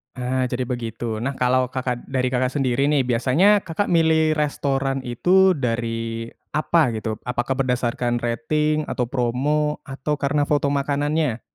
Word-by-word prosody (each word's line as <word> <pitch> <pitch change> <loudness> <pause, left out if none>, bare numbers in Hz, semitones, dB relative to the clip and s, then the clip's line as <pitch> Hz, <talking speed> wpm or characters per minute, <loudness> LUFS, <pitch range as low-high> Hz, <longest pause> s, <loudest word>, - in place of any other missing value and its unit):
Ah, 125 0 -1
jadi 125 +1 -2
begitu. 115 -2 -4
Nah, 135 +3 -3
kalau 125 0 +2
Kakak 125 -1 -4
dari 130 -1 -1
Kakak 130 0 +1
sendiri, 135 0 0
nih, 145 -3 +3
biasanya 130 - +3
Kakak 185 +2 -3
milih 160 -1 +3
restoran 135 -3 -1
itu 185 +10 +3
dari 115 -4 -2 0.2
apa 155 -1 +3
gitu? 110 -1 -4
Apakah 125 +1 -2
berdasarkan 120 -1 0
rating, 150 +6 0
atau 125 - -1
promo? 140 +4 0
Atau 140 +2 -3
karena 145 0 0
foto 145 -1 +1
makanannya? 145 -2 0
130 Hz, 140 wpm, -22 LUFS, 120-150 Hz, 0.2 s, nih